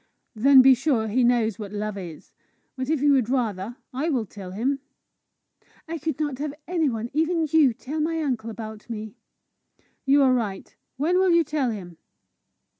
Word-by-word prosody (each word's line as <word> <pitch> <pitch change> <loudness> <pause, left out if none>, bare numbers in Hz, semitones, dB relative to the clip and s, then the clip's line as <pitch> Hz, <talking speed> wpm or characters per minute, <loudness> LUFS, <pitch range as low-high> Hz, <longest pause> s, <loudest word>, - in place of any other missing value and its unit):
"Then 260 +3 +6
be 265 0 +8
sure 250 -4 0
he 245 +4 +2
knows 235 -4 +2
what 205 -2 -6
love 210 0 -3
is. 175 -5 -9 0.4
But, 260 0 -4
if 310 -3 0
you 290 - +5
would 255 -5 +2
rather, 230 -3 -2 0.2
I 285 +6 -1
will 250 -7 0
tell 195 -1 -10
him." 250 +9 -1 1.1
"I 330 0 -4
could 310 -1 -3
not 290 -4 -2
have 295 0 -4
any 330 -4 +1
one, 230 0 -4
even 320 +2 +1
you, 305 -5 +5
tell 275 +7 -6
my 325 +1 0
uncle 250 -7 -2
about 220 0 -8
me." 215 -2 -6 0.9
"You 280 +1 +5
are 260 -1 +4
right. 210 -6 -3 0.2
When 340 +7 +2
will 380 0 +3
you 340 -1 +5
tell 295 -4 -1
him?" 180 -6 -7
255 Hz, 180 wpm, -24 LUFS, 220-300 Hz, 1.1 s, be